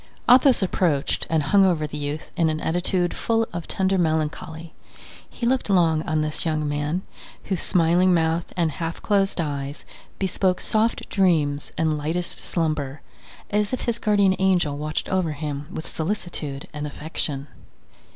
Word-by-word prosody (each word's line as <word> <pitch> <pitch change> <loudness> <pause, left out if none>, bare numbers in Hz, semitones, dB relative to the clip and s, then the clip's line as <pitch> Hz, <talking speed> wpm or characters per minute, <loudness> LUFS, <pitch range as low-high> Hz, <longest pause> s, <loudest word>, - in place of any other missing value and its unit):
Athos 250 -2 +6
approached 165 -6 0
and 160 -2 +2
hung 195 +7 +4
over 170 -5 +2
the 150 - -7
youth 145 +1 -4
in 165 -3 +2
an 155 0 -1
attitude 175 +2 +1
full 225 0 0
of 170 -1 -5
tender 190 0 +1
melancholy; 160 0 -2 0.6
he 235 - -5
looked 255 -2 +1
long 165 -5 +3
on 155 0 +1
this 155 0 -2
young 155 -2 0
man, 145 +5 -1 0.4
whose 190 -4 -2
smiling 175 +2 +3
mouth 165 -1 +1
and 165 -3 +2
half 165 +2 -4
closed 195 -2 +1
eyes 145 -2 -3 0.3
bespoke 185 -1 +1
soft 220 +1 +1
dreams 155 -7 +1
and 155 -2 +1
lightest 165 +4 -2
slumber, 155 -4 -2 0.5
as 210 +2 +1
if 255 - -1
his 235 -1 -1
guardian 200 -3 +3
angel 180 -6 +2
watched 150 +1 -3
over 185 -5 0
him 145 -1 -5
with 160 - -5
solicitude 160 -6 -3
and 150 0 -4
affection. 145 -2 -3
165 Hz, 150 wpm, -24 LUFS, 150-190 Hz, 0.6 s, Athos